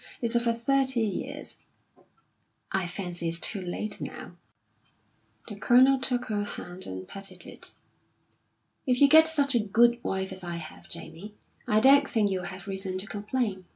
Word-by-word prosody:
It's 235 0 +1
over 235 0 +2
thirty 260 +1 +1
years." 215 -3 -4 1.1
"I 190 -2 0
fancy 175 -2 -4
it's 165 0 0
too 195 +3 0
late 195 +4 -4
now." - - -7 1.1
The 210 - -7
Colonel 255 +6 +5
took 250 -1 -1
her 210 -1 -2
hand 185 -2 -7
and 95 0 -7
patted 195 -3 -8
it. - - -7 1.1
"If 250 -1 +2
you 280 - +7
get 315 +2 +7
such 285 -4 +2
a 240 - +3
good 235 +3 +3
wife 190 0 -2
as 190 0 -8
I 175 -1 -4
have, 160 -2 -9
Jamie, 205 +5 -9 0.3
I 215 - +4
don't 275 +3 +6
think 210 -4 +1
you'll 185 -1 -2
have 185 +1 -7
reason 190 -1 -2
to 190 - -3
complain. 210 -2 -3
210 Hz, 160 wpm, -27 LUFS, 185-245 Hz, 1.1 s, you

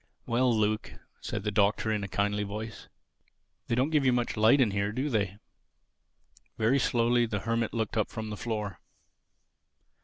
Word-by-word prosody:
"Well, 125 +2 +2
Luke," 110 -1 0 0.3
said - - -4
the 105 - -1
Doctor 105 +1 +2
in 105 -2 -1
a - - -3
kindly 100 +1 0
voice, 105 +2 -6 0.8
"they 115 - 0
don't 130 +5 +1
give 150 -3 +3
you 130 - +4
much 120 -1 0
light 110 +6 +5
in 120 -6 +3
here, 100 +1 -1
do 130 +6 -2
they?" 100 -3 0 1.2
Very 115 +5 +3
slowly 120 -1 +2
the 105 -3 -3
Hermit 115 0 -1
looked 115 -1 -2
up 110 - +1
from 110 -1 -5
the - - -3
floor. 105 -6 -4
110 Hz, 165 wpm, -29 LUFS, 105-120 Hz, 1.2 s, light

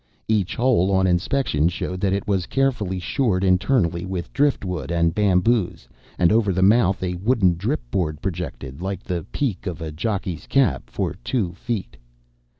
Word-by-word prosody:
Each 105 -5 +1
hole 120 -7 +3
on 95 -1 +3
inspection 90 - +1
showed 90 +1 -4
that 100 -2 +2
it 100 +1 -1
was 95 -3 0
carefully 120 -9 0
shored 95 0 0
internally 90 -2 +2
with 90 -2 -5
drift 140 -6 +1
wood 90 -2 -4
and 85 -1 +2
bamboos, 100 - +1 0.3
and 85 +1 +4
over 110 -2 +3
the 95 +1 +1
mouth 100 -2 +4
a 90 -1 -1
wooden 100 -2 +3
drip 110 - -2
board 80 -6 -1
projected, 80 -6 -5
like 95 0 -4
the 85 -4 -4
peak 110 -8 -2
of 85 -3 -4
a 80 -2 -5
jockey's 95 0 -3
cap, 135 -8 +1
for - - -2
two 100 -9 -1
feet. 105 - -4
95 Hz, 165 wpm, -22 LUFS, 90-110 Hz, 0.3 s, and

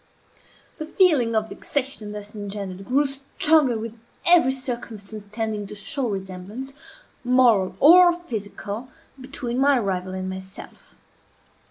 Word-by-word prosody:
The 310 - -5
feeling 305 - +3
of 220 0 0
vexation 265 -7 -3
thus 210 0 -8
engendered 200 -2 -6
grew 275 +4 +2
stronger 275 -1 +1
with 225 0 -6 0.3
every 340 -7 +7
circumstance 225 -6 -5
tending 215 -1 -3
to 210 - -9
show 255 +5 -1
resemblance, 195 +7 -6 0.5
moral 245 -6 +3
or 350 +4 +8
physical, 230 - -6 0.3
between 255 -2 -4
my 280 0 +4
rival 185 -4 -2
and 185 0 -4
myself. 190 0 -10
230 Hz, 120 wpm, -23 LUFS, 205-275 Hz, 0.5 s, or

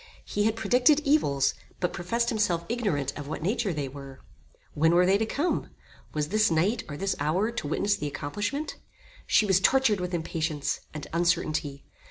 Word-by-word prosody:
He 205 0 -1
had 220 0 +2
predicted 250 +7 +4
evils, 140 - +2 0.3
but 180 - -1
professed 230 +7 -1
himself 180 -7 0
ignorant 195 - -1
of 145 -1 -7
what 155 +1 -5
nature 205 +2 0
they 145 -4 -3
were. 135 -1 -10 0.5
When 160 +3 +3
were 180 +1 +5
they 195 +2 +3
to 220 - 0
come? 300 +9 -1 0.4
Was 150 -1 -2
this 215 +1 +3
night, 185 +9 +1
or 145 - -5
this 195 +3 -1
hour 175 +10 +1
to 230 - -4
witness 200 +7 +1
the 150 - -3
accomplishment? 205 - -3 0.5
She 215 - +4
was 190 -2 +4
tortured 225 -1 +3
with 180 0 -2
impatience, 160 -3 -2
and 150 -1 -7
uncertainty. 160 -5 0
180 Hz, 175 wpm, -27 LUFS, 150-220 Hz, 0.5 s, were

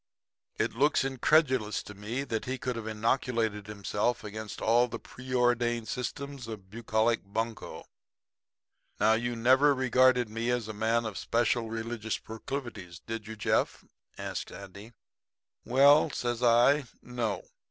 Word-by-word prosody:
It - - 0
looks 145 +5 +3
incredulous 130 -4 +2
to 105 - -10
me 110 +7 -4
that 115 -5 -3
he 130 +1 -2
could 125 0 -3
have 115 -1 -5
inoculated 110 -1 0
himself 105 +3 -1
against 105 0 -7
all 120 +2 +3
the - - -5
preordained 120 -2 0
systems 140 0 -5
of 100 -4 -9
bucolic 115 +1 +1
bunco. 110 +3 -4 1.1
Now, 110 +2 +5
you 120 +1 -1
never 130 +5 +4
regarded 130 -1 +4
me 115 +2 -3
as 120 -3 0
a 110 - -5
man 115 +2 +1
of 105 -5 -4
special 115 0 +1
religious 115 -1 -3
proclivities, 110 -6 -7
did 115 +3 -6
you, 110 - -6
Jeff?' 105 - 0 0.3
says - - -4
Andy. 100 +4 -11 0.7
"'Well,' 140 +5 +6
says 120 -3 -2
I, 125 +4 +5 0.2
'No. 120 -4 -3
115 Hz, 135 wpm, -29 LUFS, 110-125 Hz, 1.1 s, Well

